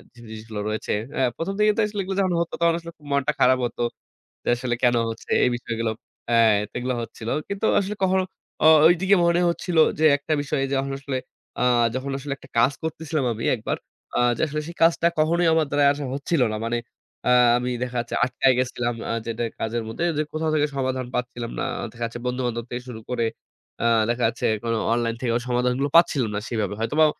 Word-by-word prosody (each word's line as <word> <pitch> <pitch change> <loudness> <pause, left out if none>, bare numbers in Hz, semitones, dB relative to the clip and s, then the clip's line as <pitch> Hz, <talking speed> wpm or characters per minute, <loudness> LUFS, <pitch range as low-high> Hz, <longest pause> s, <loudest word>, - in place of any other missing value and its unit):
জিনিসগুলো 110 -2 -8
রয়েছে। 110 - -2 0.3
আ - - +2 0.2
১ম 185 +4 -2
দিকে 210 0 +5
তো - - +3
আসলে 205 -1 -6
এগুলো 190 +1 -4
যখন 185 -2 +1
হত 170 - -3
তখন 170 0 +4
আসলে 170 0 -9 0.2
মনটা 140 -1 +2
খারাপ 130 0 +5
হত। 120 - -6 0.6
যে, - - -15
আসলে 120 0 -2
কেনো 120 -1 +4
হচ্ছে, 115 - -8
এই - - +4
বিষয়গুলো, 115 -2 -2 0.4
এ্যা 120 - +3 0.3
তো - - -52
এগুলো 125 0 -2
হচ্ছিল। 115 -1 -7 0.2
কিন্তু 200 +2 -2
আসলে 200 +2 -3
কখনো 190 0 +3 0.4
ও - - +5 0.2
ঐদিকে 185 +4 +4
মনে 170 +1 +3
হচ্ছিল 170 0 -2 0.2
যে, - - +1
একটা 150 +2 -2
বিষয় 145 0 -2
যখন 135 0 0
আসলে 140 -2 -3 0.4
আ - - +1 0.3
যখন 135 +2 -3
আসলে 140 +1 -4
একটা 135 - -17
কাজ 120 +4 +5
করছিলাম 160 -2 -2
আমি 115 - -6
একবার, 110 - -3 0.4
আ - - +2 0.2
যে, - - -3
আসলে 150 +1 -3
সেই 170 - -8
কাজটা 165 0 +4
কখনোই 170 +3 +3
আমার 160 -1 +3
দ্বারা 145 0 +3
আ - - +5 0.2
হচ্ছিল 145 +2 0
না। - - -2
মানে, 120 +1 0 0.5
আ - - +4 0.3
আমি 125 +1 -2
দেখা 125 0 -4
যাচ্ছে 120 0 -3
আটকায় 130 +1 +3
গেছিলাম 125 -1 -1 0.2
আ - - 0
যেটা, 115 0 -3 0.2
কাজের 115 +1 -2
মধ্যে 115 +9 -4
যে - - +2
কোথাও 155 0 -1
থেকে 150 -1 +2
সমাধান 130 -1 -1
পাচ্ছিলাম 120 -1 -3
না। - - -1 0.3
দেখা 120 +1 -7
যাচ্ছে, 115 +1 -6
বন্ধু-বান্ধব 125 -2 -2 0.2
শুরু 120 -3 -7
করে। 120 -2 0 0.6
আ - - +1 0.2
দেখা 120 +1 0
যাচ্ছে 115 - -3
এখন 115 +2 -3 0.2
অনলাইন 115 -1 0
থেকে, 125 -2 0 0.2
সমাধানগুলো 125 +3 +1
পাচ্ছিলাম 140 -8 +4
না - - 0
সেভাবে, 110 -4 -1
হয়তোবা 150 +8 +3
130 Hz, 195 wpm, -24 LUFS, 120-160 Hz, 0.6 s, দিকে